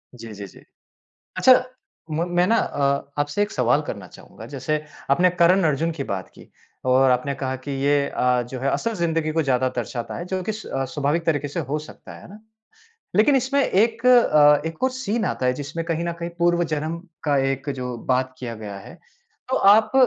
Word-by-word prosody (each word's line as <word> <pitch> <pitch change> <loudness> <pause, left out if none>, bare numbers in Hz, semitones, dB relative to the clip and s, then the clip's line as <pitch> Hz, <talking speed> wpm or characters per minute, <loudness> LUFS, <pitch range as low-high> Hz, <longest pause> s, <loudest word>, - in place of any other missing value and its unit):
जी, 115 -2 -10
जी, 100 0 -8
जी। - - -17 0.7
अच्छा, 260 - +7 0.6
म 160 +3 0
मैं 180 - +4
ना 230 - +3
अ, 140 0 0
आपसे 145 +8 0
एक 205 - -1
सवाल 125 +3 +2
करना 100 -4 -6
चाहूँगा। - - -13
जैसे 150 +3 -2 0.3
आपने 180 +5 +4
करन 185 +3 +5
अर्जुन 155 +2 +1
की 140 - -3
बात 95 -1 -4
की - - -15 0.4
और 130 +1 +5
आपने 125 +3 0
कहा 130 -1 -3
कि 130 +2 -9
ये 145 0 +2
अ, 125 -1 +1
जो 125 +2 -7
है 140 - 0
असल 230 - -1
ज़िंदगी 165 -3 -1
को 160 0 +1
ज़्यादा 130 -2 +1
दर्शाता 120 0 -4
है, 175 - -5
जो 185 0 -3
कि 215 - -2
स 215 +1 -8 0.3
स्वाभाविक 150 +3 0
तरीके 145 -3 0
से 170 +4 -3
हो 150 - -1
सकता 150 - -12
है, - - -13
है - - -13
ना? 205 +3 -13 0.8
लेकिन 270 +7 +5
इसमें 270 +2 +1
एक 230 +4 +1
अ, 150 - +6
एक 160 +5 -6
और 260 - +2
सीन 235 -4 -2
आता 130 - -1
है, 125 - +3
जिसमें 145 +4 -5
कहीं 165 0 -1
न 170 - -2
कहीं 170 0 -4
पूर्व 175 0 +2
जन्म 155 +3 -3 0.3
का 145 -2 +2 0.2
एक 135 +2 -6
जो 125 -1 -4 0.2
बात 130 0 0
किया 120 -2 -5
गया 105 -2 -8
है। 95 - -12 0.6
तो 260 - +2
आप 215 +2 +5
150 Hz, 205 wpm, -23 LUFS, 130-180 Hz, 0.8 s, अच्छा